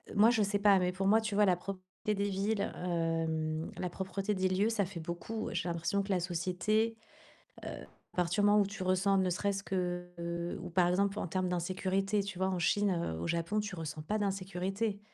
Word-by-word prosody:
moi, 215 +3 +7
je 225 -3 +3
sais 200 0 0
pas, 200 -2 +6
mais 180 0 0
pour 195 +1 -2
moi, 220 +2 +6
tu 220 -2 -2
vois 210 - +5
la 180 -2 +3
propreté 185 0 -6 0.3
des 200 +1 0
villes, 200 +2 0
hem, 165 -3 -1
la 180 - -2
propreté 190 +3 -2
des 185 0 +2
lieux, 190 +4 +2
ça 215 -4 +1
fait 175 -3 -7
beaucoup. 175 +7 -4
J'ai - - -2
l'impression 170 +4 0
que 200 - -7
la 180 -2 +2
société, 185 +6 0
heu, - - -34 1.2
à - - -21
partir 180 +3 +2
du - - +5
moment 210 0 +6
où 200 - +3
tu 200 0 -6
ressens, 185 +2 +3
ne 185 -1 +2
serait-ce 200 +2 -1
que, 180 -2 -2
heu 170 0 -3
ou 175 - -6
par 175 0 +3
exemple 200 +3 +1
en - - -2
termes 185 +1 -1
d'insécurité, 190 +3 0
tu 195 -2 -6
vois 190 0 +1
en 185 -2 -1
Chine, 200 +3 +2
heu, 170 - -1
au 85 - -3
Japon, 170 - 0
tu 210 -2 -4
ressens 155 -2 -5
pas 210 +7 -1
d'insécurité. 195 +1 -2
190 Hz, 220 wpm, -32 LUFS, 175-200 Hz, 1.2 s, moi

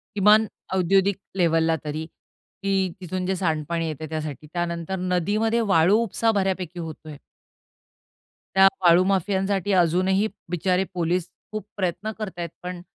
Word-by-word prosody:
किमान 210 +2 +6 0.3
औद्योगिक 190 +2 +3 0.2
लेव्हलला 165 -2 +3
तरी, 155 +1 -4
की 195 +3 -4
तिथून 185 +1 -3
जे 190 +1 0
सांडपाणी 165 -1 -1
येतं 155 0 -5
आहे 155 - -6
त्यासाठी. 155 -2 -5
त्यानंतर 175 +1 -2
नदीमध्ये 205 +6 +1
वाळू 165 +6 +5
उपसा 225 +1 +1
बऱ्यापैकी 190 -4 -1
होतं 160 -1 -7
आहे. 150 - -8 1.4
त्या 190 0 +8
वाळू 175 0 +6
माफियांसाठी 195 +1 0
अजूनही 185 +3 +3 0.2
बिचारे 180 +1 +1
पोलीस 175 0 -1 0.2
खूप 215 -2 -5
प्रयत्न 200 +3 -2
करत 200 -5 -6
आहेत, 170 -2 -3
पण 180 -1 -5
180 Hz, 135 wpm, -24 LUFS, 165-195 Hz, 1.4 s, त्या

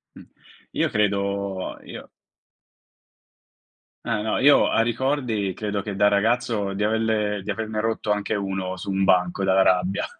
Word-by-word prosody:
Mh. - - -12 0.5
Io - - 0
credo 100 -2 -1
io - - -10 2.0
Eh 110 -2 -1
no, 110 +1 -1
io 145 +2 +5
a - - +1
ricordi 120 -4 -1
credo 105 +1 -3
che 100 0 -5
da 100 +1 +3
ragazzo 105 0 +1
di 100 +1 -2
averne 110 -2 0
di - - -3
averne 110 -1 -3
rotto 110 -1 -2
anche 105 +1 -1
uno 95 -2 -3
su 95 - -7
un 95 0 0
banco 90 0 +2
dalla 95 0 +3
rabbia, 95 +1 +1
105 Hz, 145 wpm, -23 LUFS, 95-110 Hz, 2.0 s, io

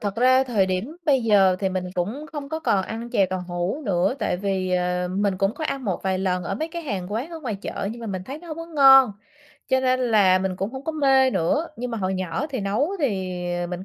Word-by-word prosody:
thật 205 -1 -3
ra, 255 +2 +4
thời 220 -7 +1
điểm 190 - -3
bây 270 -4 +3
giờ 195 -4 +4
thì 195 - +1
mình 185 -1 -3
cũng 210 +12 -3
không 290 -2 -6
có 320 +1 -4
còn 200 -11 +2
ăn 230 +3 -6
chè 195 -4 +3
tàu 185 0 -4
hủ 175 - -2
nữa. 190 +4 +1
Tại 210 -6 -1
vì, 190 -1 -2
ờ, 180 0 0
mình 195 +1 0
cũng 195 +3 +1
có 315 - -5
ăn 275 -3 -3
một 190 -5 -2
vài 190 -1 0
lần 180 -1 -1
ở - - -2
mấy 315 +1 -3
cái 340 +1 -6
hàng 200 - -4
quán 245 +10 -3
ở 330 -1 -7
ngoài 245 -8 -3
chợ, 195 0 -4
nhưng 235 - -10
mà 230 - -6
mình 190 -3 -4
thấy 275 +7 -7
nó 345 +1 -13
hổng 310 - -5
có 330 0 -6
ngon, 270 -6 +7 0.6
cho 260 -1 +3
nên 255 0 +2
là 210 -6 +4
mình 185 -1 -2
cũng 195 +3 -3
hổng 265 +1 -7
có 320 - -2
mê 270 -3 +4
nữa. 295 - 0
Nhưng 245 +1 -4
mà 230 - -3
hồi 190 -1 -1
nhỏ 185 - -2
thì 260 -4 -3
nấu 205 - 0
thì, 190 -9 -1 0.2
ờ, 175 - -2
mình 180 +1 -6
210 Hz, 265 wpm, -23 LUFS, 185-270 Hz, 0.6 s, ngon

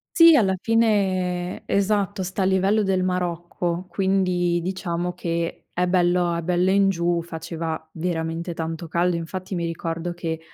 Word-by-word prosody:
Sì, 330 -2 +8
alla 195 -7 +3
fine 190 -6 +1
esatto, 200 -1 +1
sta 185 +2 -2
a - - +2
livello 190 +3 +3
del 190 -1 +1
Marocco, 175 -1 -2
quindi 180 -3 +1
diciamo 175 -1 -2
che 170 -1 -3
è 180 +1 +1
bello 175 -1 +2
è 170 - -3
bello 180 +2 +2
in 195 0 +4
giù, 170 -2 0
faceva 160 -1 -5
veramente 165 0 -3
tanto 165 +1 -4
caldo. 170 +2 +1
Infatti 185 +3 -5
mi 170 -1 -1
ricordo 165 +1 -3
che 165 -2 -4
180 Hz, 150 wpm, -23 LUFS, 170-190 Hz, -, Sì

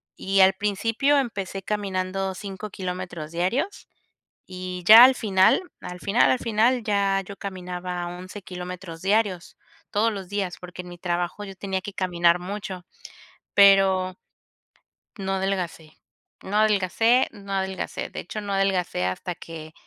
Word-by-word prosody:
y 195 0 +1
al 190 0 +7
principio 225 +8 +1
empecé 200 -7 -3
caminando 195 -2 -2
5 200 +1 -7
kilómetros 180 -4 -6
diarios, 210 - -2 0.6
y 185 -1 -6
ya 220 +5 +11
al 260 +1 +7
final, 195 - +3 0.2
al 180 0 -7
final, 200 +6 +3
al 255 - +1
final, 230 +2 +2
ya 200 -2 +1
yo 200 - -9
caminaba 180 -2 -5
11 185 +3 -8
kilómetros 180 -2 -8
diarios, 195 -3 0 0.3
todos 220 +3 +2
los 195 -4 -7
días, 195 -3 -2
porque 180 0 -8
en 180 - -11
mi 175 - -10
trabajo 175 +3 -2
yo 195 - -8
tenía 190 -1 -3
que 200 +1 -8
caminar 175 -2 +2
mucho, 185 -1 -6 0.7
pero 195 -2 +5 1.0
no 195 -2 -3
adelgacé, 185 -5 -3 0.5
no 205 +2 -3
adelgacé, 215 +4 +3
no 200 -2 -10
adelgacé, 190 -1 -3
de - - -8
hecho, 215 +5 -5
no 205 -1 -5
adelgacé 190 - 0
hasta 95 - -3
que 160 -2 -9
190 Hz, 140 wpm, -24 LUFS, 180-205 Hz, 1.0 s, ya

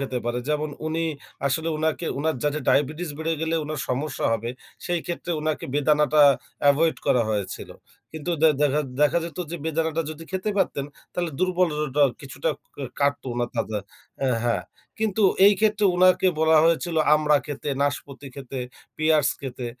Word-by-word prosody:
খেতে 130 -2 -2
পারে। 120 +1 -1
যেমন 150 0 0 0.2
উনি 160 +1 -1 0.4
আসলে 160 +4 0
উনাকে 160 +2 -1
উনার 155 +1 0
যাতে 150 +1 +1
ডায়াবেটিস 150 +4 +1
বেড়ে 160 +1 -1
গেলে 160 0 0
উনার 155 -1 -4
সমস্যা 135 +2 -2
হবে 115 +1 -2 0.3
সেই 175 -1 0
ক্ষেত্রে 175 0 -4
উনাকে 155 0 -2
বেদানাটা 150 0 +4 0.5
এভয়েড 160 +3 +2
করা 125 - +4
হয়েছিল। 105 -3 -3 0.4
কিন্তু 160 +2 -4
দে 160 - +8
দেখা 150 +1 +3 0.2
দেখা, 150 +3 +4
যেত 170 +2 -8
যে 170 - -3
বেদানাটা 160 0 0
যদি 160 +1 -8
খেতে 190 +3 -1
পারতেন 140 -7 0 0.3
তাহলে 175 -2 -2
দুর্বললটা 155 -6 +1 0.2
কিছুটা 135 +3 -3 0.3
কা 140 - -5 0.2
কাটত 140 0 +1
উনার 120 0 -1
তা - - +1
যা, 105 - -1 0.5
আ - - +3 0.2
হ্যাঁ, 120 - +1 0.4
কিন্তু 220 -1 0 0.2
এই 205 - +8
ক্ষেত্রে 215 -1 +2
উনাকে 185 +1 +5
বলা 160 0 +5
হয়েছিল 165 +1 +1 0.2
আমড়া 150 -1 +3
খেতে, 145 0 -5
নাশপতি 145 -1 -3
খেতে, 135 -1 -7 0.4
পিয়ার্স 155 -2 +3
খেতে, 125 -2 -5
155 Hz, 160 wpm, -24 LUFS, 140-165 Hz, 0.5 s, দে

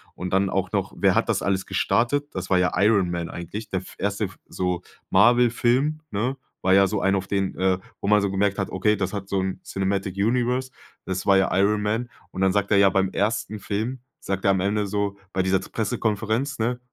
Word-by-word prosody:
Und 90 0 -5
dann 95 0 +3
auch 95 0 -1
noch 95 -2 -1
wer - - +3
hat - - +2
das - - +1
alles 95 -1 0
gestartet? 145 +5 +1
Das 95 0 -4
war 95 - +4
ja 90 - +2
Iron 100 -2 +3
Man 85 -1 -3
eigentlich. 100 +6 -7
Der 95 - -1
f - - -13
erste 100 +1 -1
f 90 -4 -10
so 90 -1 -2 0.3
Marvel 120 +5 +5
Film, 130 +6 +1
ne, 120 +7 -1 0.2
war 95 - +3
ja 95 0 +6
so 100 +1 -2
ein 95 0 +2
auf 95 0 -2
den 100 -1 -1
äh, 95 -1 +2 0.2
wo - - -3
man 105 0 +5
so 100 -1 0
gemerkt 100 0 +1
hat, 95 - -1
okay, 105 +3 +1
das 95 -1 -2
hat 100 -1 -4
so 100 - 0
'n 95 0 -3
Cinematic 95 0 -2
Universe, 125 +4 +1 0.3
das 95 0 -3
war 100 -1 +5
ja 95 - +3
Iron 105 +2 +3
Man. 110 +4 -1 0.2
Und 95 - -5
dann 95 -1 +3
sagt 100 0 0
er 100 - +5
ja, 100 0 +6
beim 95 0 +1
ersten 105 +1 -1
Film 110 +6 -3 0.2
sagt 95 0 -3
er 100 - +5
am 95 - +1
Ende 100 +2 0
so, 100 0 -2 0.2
bei 95 - +1
dieser 95 0 +2
z - - -11
Pressekonferenz, 110 +5 -1
ne, 120 +2 0
100 Hz, 230 wpm, -24 LUFS, 95-110 Hz, 0.3 s, ja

